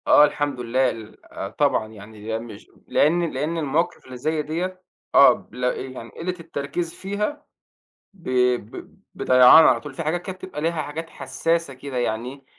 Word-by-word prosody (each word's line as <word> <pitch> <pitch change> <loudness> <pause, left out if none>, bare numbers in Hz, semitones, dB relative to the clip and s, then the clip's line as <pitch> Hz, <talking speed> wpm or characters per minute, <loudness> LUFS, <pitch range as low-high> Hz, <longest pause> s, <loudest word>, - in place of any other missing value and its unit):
آه، 150 - +8
الحمد 145 -3 -2
لله، 125 +2 +1
ل 110 -1 -10
آآ، 95 - -6
طبعًا 125 -2 +1
يعني 110 +1 -7
مش 115 -2 -11 0.2
لأن 170 +2 +2
لأن 150 +5 -2
المواقف 165 +3 -1
اللي 130 -1 -9
زي 155 +4 -1
ديّة، 180 +5 -4 0.3
آه، - - +9
ب - - -13
لا، 125 0 0
يعني 130 -3 -7
قلة 180 +2 -4
التركيز 165 +1 -4
فيها، 210 +9 -4 0.7
ب 185 -3 -22 0.3
ب 110 -2 -10 0.2
بضيعان 130 +5 +7
على 120 - +5
طول، - - -9
في 165 - -4
حاجات 160 +3 -1
كانت 185 0 -7
بتبقى 185 -5 -7
ليها 165 0 0
حاجات 160 +3 -6
حساسة 165 -3 -1
كده 130 0 -7
يعني، 125 +3 -3
145 Hz, 165 wpm, -23 LUFS, 125-165 Hz, 0.7 s, آه